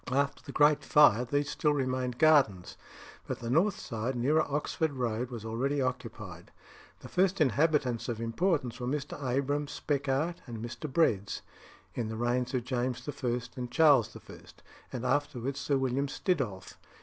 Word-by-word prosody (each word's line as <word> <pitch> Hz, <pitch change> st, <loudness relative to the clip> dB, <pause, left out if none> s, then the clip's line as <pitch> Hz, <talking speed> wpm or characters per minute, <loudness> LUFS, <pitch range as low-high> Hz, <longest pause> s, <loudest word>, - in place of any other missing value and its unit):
After 140 Hz, +2 st, 0 dB
the 140 Hz, -, -9 dB
Great 150 Hz, 0 st, +4 dB
Fire, 125 Hz, -5 st, +5 dB
these 145 Hz, +3 st, -1 dB
still 150 Hz, -2 st, +1 dB
remained 130 Hz, -2 st, -1 dB
gardens, 135 Hz, -, +3 dB, 0.5 s
but -, -, -3 dB
the 115 Hz, 0 st, -4 dB
north 185 Hz, +8 st, +3 dB
side, 115 Hz, +2 st, -3 dB
nearer 145 Hz, +6 st, +3 dB
Oxford 150 Hz, +1 st, -1 dB
Road, 120 Hz, -1 st, -2 dB
was 115 Hz, -3 st, -7 dB
already 130 Hz, +6 st, -1 dB
occupied. 115 Hz, -9 st, -4 dB, 0.5 s
The -, -, -9 dB
first 185 Hz, +1 st, +1 dB
inhabitants 140 Hz, -3 st, +2 dB
of 115 Hz, -2 st, -3 dB
importance 125 Hz, +1 st, -1 dB
were 125 Hz, -, -3 dB
Mr. 145 Hz, +1 st, -3 dB
Abraham 140 Hz, +3 st, 0 dB
Speckart 145 Hz, +4 st, -1 dB
and 115 Hz, -2 st, -6 dB
Mr. 120 Hz, +5 st, -6 dB
Breads, 105 Hz, -, +1 dB, 0.5 s
in 120 Hz, -3 st, -2 dB
the 110 Hz, -, -5 dB
reigns 125 Hz, +2 st, 0 dB
of 125 Hz, -, 0 dB
James 125 Hz, 0 st, -2 dB
I. 140 Hz, -3 st, -4 dB, 0.3 s
and 125 Hz, -2 st, -5 dB
Charles 140 Hz, -4 st, +4 dB
I., -, -, -10 dB, 0.5 s
and 125 Hz, -1 st, -4 dB
afterwards 135 Hz, 0 st, -1 dB
Sir 140 Hz, 0 st, +1 dB
William 135 Hz, +1 st, 0 dB
Stiddolph. 135 Hz, -, -2 dB
130 Hz, 155 wpm, -30 LUFS, 120-145 Hz, 0.5 s, Fire